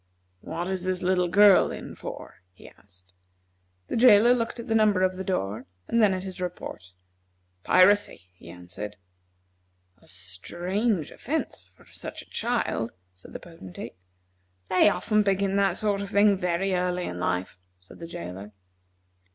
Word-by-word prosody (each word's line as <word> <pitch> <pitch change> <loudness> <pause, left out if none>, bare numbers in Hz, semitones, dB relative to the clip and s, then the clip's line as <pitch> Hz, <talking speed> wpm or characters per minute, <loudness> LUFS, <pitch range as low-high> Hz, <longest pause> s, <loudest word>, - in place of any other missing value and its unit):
"What 165 - -5
is 190 -1 -3
this 185 0 -2
little 180 -1 +2
girl 200 +2 +6
in - - -7
for?" - - -9
he - - -15
asked. 90 -2 -19 0.7
The - - -3
jailer 235 0 +7
looked 235 -1 -2
at 235 - -7
the 225 - 0
number 210 -4 +3
over 185 0 +1
the 190 - -5
door, 105 - -3 0.2
and 230 - +2
then 210 -2 +5
at 185 -1 -3
his 190 -1 -8
report. 170 - -6 0.7
"Piracy," 205 - +4
he 85 -1 -15
answered. 90 +4 -8 1.0
"A - - -23
strange 175 - -2
offence 310 +5 -4
for - - -21
such - - -8
a - - -26
child," 230 - -1 0.2
said 90 - -15
the - - -6
Potentate. 165 - -10 0.7
"They 185 +3 +5
often 215 +1 +1
begin 195 -1 +1
that 195 -2 +2
sort 205 -2 0
of 200 - -5
thing 200 0 +4
very 185 +1 -1
early 180 0 -1
in 90 - -5
life," 90 0 -2 0.2
said 90 - -16
the 165 - -7
jailer. 95 - -8
185 Hz, 155 wpm, -26 LUFS, -, 1.0 s, jailer